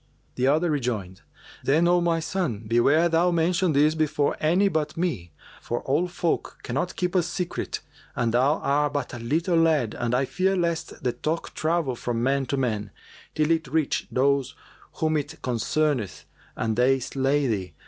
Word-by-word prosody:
The 130 +1 0
other 155 +4 +2
rejoined, 110 -10 -3 0.4
"Then, 160 +5 +3
O 175 0 +4
my 170 -1 +1
son, 160 - -2
beware 140 +9 +4
thou 170 +2 +3
mention 175 +1 +1
this 150 +2 +4
before 150 -2 0
any 175 +6 +3
but 155 -4 -1
me; 125 - -2 0.3
for 120 - -3
all 150 +7 +1
folk 175 -1 -2
cannot 140 +9 -2
keep 180 -1 -1
a 185 - +4
secret 175 +1 -3 0.3
and 115 -2 0
thou 135 +5 +3
art 145 +1 +1
but 145 -3 -3
a 120 - -6
little 165 +9 0
lad 155 -9 +2
and 120 0 -1
I 130 +2 +2
fear 190 +7 0
lest 170 -2 -2
the 125 - +1
talk 155 +7 -3
travel 160 -5 0
from 120 0 -2
man 135 0 +1
to 140 - -1
man, 110 -6 -1 0.5
till 155 +1 +2
it 160 -1 +1
reach 155 -2 0
those 140 +1 +1 0.4
whom 155 -1 0
it 150 +2 -5
concerneth 125 -1 -1 0.3
and 110 -1 -1
they 130 +3 +3
slay 135 +3 0
thee. 100 -7 -2
145 Hz, 170 wpm, -25 LUFS, 125-165 Hz, 0.5 s, O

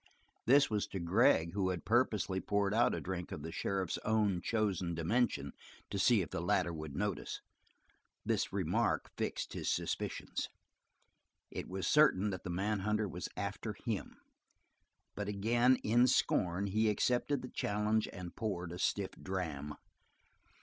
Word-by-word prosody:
This 140 +3 +6
was 105 -2 -1
to 95 - -5
Gregg, 85 -2 +3
who 95 -2 +1
had 90 -4 -3
purposely 105 -5 +2
poured 100 -1 +1
out 120 +2 +3
a - - -3
drink 90 -1 -5
of 75 - -6
the 80 - -5
sheriff's 95 0 -2
own 105 -5 +1
chosen 95 -5 0
dimension 85 - 0 0.4
to 100 - -2
see 110 -1 +4
if 80 - -9
the - - -2
latter 85 - +1
would 75 -3 -6
notice; 100 -1 -2 0.9
this - - 0
remark - - 0
fixed - - -3
his - - -2
suspicions. - - -2 1.0
It - - -5
was 95 +1 -3
certain 105 -10 +4
that 95 - -5
the - - -5
manhunter 105 +3 0
was 90 - -5
after - - -3
him, - - -4 1.0
but 105 -1 -4
again, 120 +5 +3
in 120 +4 +4
scorn, 95 -6 +2
he 110 +3 +2
accepted 125 +5 +1
the 125 - -6
challenge 105 +1 0
and 90 -2 -8
poured 90 -6 -3
a 90 - -6
stiff 100 0 0
dram. 80 -6 -4
100 Hz, 150 wpm, -34 LUFS, 90-110 Hz, 1.0 s, This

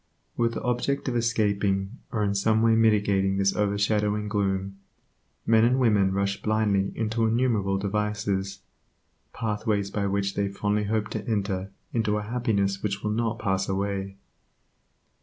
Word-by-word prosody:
With 115 -1 0
the - - -4
object 125 +3 -1
of 125 - -3
escaping, 105 -2 0
or 105 -2 0
in 100 -1 +1
some 110 +3 +2
way 115 0 +5
mitigating 100 -3 +3
this 100 0 +2
overshadowing 105 +1 +1
gloom, 95 -2 -1 0.7
men 110 -1 +4
and 125 +2 +3
women 105 -7 +3
rush 100 +1 -1
blindly 105 -3 +1
into 115 0 0
innumerable 110 -5 +1
devices, 100 -1 -2 0.7
pathways 105 -2 -1
by 100 -1 -1
which 100 0 -1
they 100 -1 0
fondly 105 +1 -1
hope 105 0 -1
to 110 - -5
enter 100 -3 -1 0.2
into 110 -3 +1
a 105 - -3
happiness 105 -4 0
which 100 -1 -3
will 105 - 0
not 115 +1 -1
pass 95 -3 -1
away. 95 0 -2
105 Hz, 145 wpm, -26 LUFS, 100-110 Hz, 0.7 s, way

